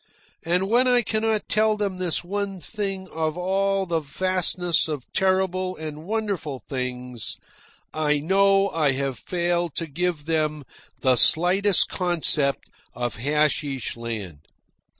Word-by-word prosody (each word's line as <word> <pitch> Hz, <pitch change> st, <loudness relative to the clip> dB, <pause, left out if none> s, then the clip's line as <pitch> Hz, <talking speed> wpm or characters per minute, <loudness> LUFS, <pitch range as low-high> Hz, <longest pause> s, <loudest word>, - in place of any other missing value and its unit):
And 180 Hz, +3 st, +1 dB
when 245 Hz, +4 st, +3 dB
I 245 Hz, -1 st, +4 dB
cannot 220 Hz, 0 st, 0 dB
tell 215 Hz, 0 st, +2 dB
them 200 Hz, -3 st, -2 dB
this 175 Hz, -3 st, -1 dB
one 195 Hz, +1 st, -3 dB
thing 195 Hz, +1 st, -4 dB
of 160 Hz, 0 st, -2 dB
all 195 Hz, +2 st, +1 dB
the 170 Hz, -2 st, 0 dB
vastness 180 Hz, +2 st, +1 dB
of 150 Hz, -5 st, -4 dB
terrible 185 Hz, -1 st, +1 dB
and 155 Hz, 0 st, -7 dB
wonderful 200 Hz, -9 st, -2 dB
things, 125 Hz, -3 st, -5 dB, 0.6 s
I 150 Hz, -1 st, +1 dB
know 195 Hz, +4 st, +3 dB
I 155 Hz, -6 st, +1 dB
have 135 Hz, -1 st, -2 dB
failed 175 Hz, -2 st, -1 dB
to 165 Hz, -, -1 dB
give 165 Hz, 0 st, -2 dB
them 155 Hz, -2 st, 0 dB, 0.4 s
the 130 Hz, -1 st, +3 dB
slightest 185 Hz, -, +4 dB
concept 160 Hz, -6 st, 0 dB, 0.3 s
of 120 Hz, -4 st, -3 dB
Hasheesh 145 Hz, 0 st, 0 dB
Land. 110 Hz, -9 st, -6 dB
175 Hz, 130 wpm, -24 LUFS, 150-195 Hz, 0.6 s, I